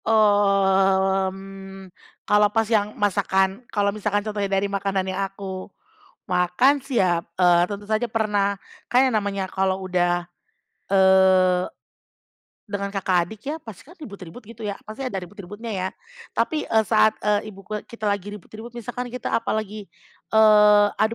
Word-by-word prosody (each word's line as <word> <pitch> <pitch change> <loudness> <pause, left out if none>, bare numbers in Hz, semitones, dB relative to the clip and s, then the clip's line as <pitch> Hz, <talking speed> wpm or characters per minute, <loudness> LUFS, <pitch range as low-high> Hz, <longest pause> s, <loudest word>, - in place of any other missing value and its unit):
Mmm, 195 -2 +1 0.3
kalau 210 0 +4
pas 225 +1 +1
yang 210 -1 0
masakan 195 0 +1
kalau 200 -1 0
misalkan 205 0 -1
contohnya 205 -2 -2
dari 195 0 +1
makanan 195 -1 -1
yang 195 - -2
aku 190 -1 -7 0.6
makan 180 +11 +2
sih 270 -3 -2
ya, 175 -2 +1 0.2
eee, 175 -1 +5
tentu 205 0 -6
saja 220 +2 +1
pernah. 205 -3 0 0.3
Kan 260 +2 +4
yang 240 - -1
namanya 200 -1 -2
kalau 190 0 -1
udah, 175 -1 0 0.7
eee, 190 -1 +4 1.0
dengan 200 -1 -3
kakak 190 -2 0
adik 215 +4 -11
ya, 310 - -3
pasti 225 - -11
kan 345 +6 -17
ribut-ribut 200 - -10
gitu 230 +2 -14
ya, 200 -1 -3
pasti 215 +4 -10
ada 250 -6 -3
ribut-ributnya 205 +5 -9
ya, 190 -2 -2 0.5
tapi, 310 -2 0
eee, 220 -1 +3
saat, 215 0 +4
eee, 210 0 +1
ibu 195 - -13
ku 215 - -5
kita 235 -2 -10
lagi 200 -1 -2
ribut-ribut 215 +3 -10
misalkan 245 +2 -5
kita 250 -1 -4
apalagi, 215 -2 -3 0.4
eee, 210 -1 +6
adu 220 +1 +2
200 Hz, 150 wpm, -23 LUFS, 190-215 Hz, 1.0 s, eee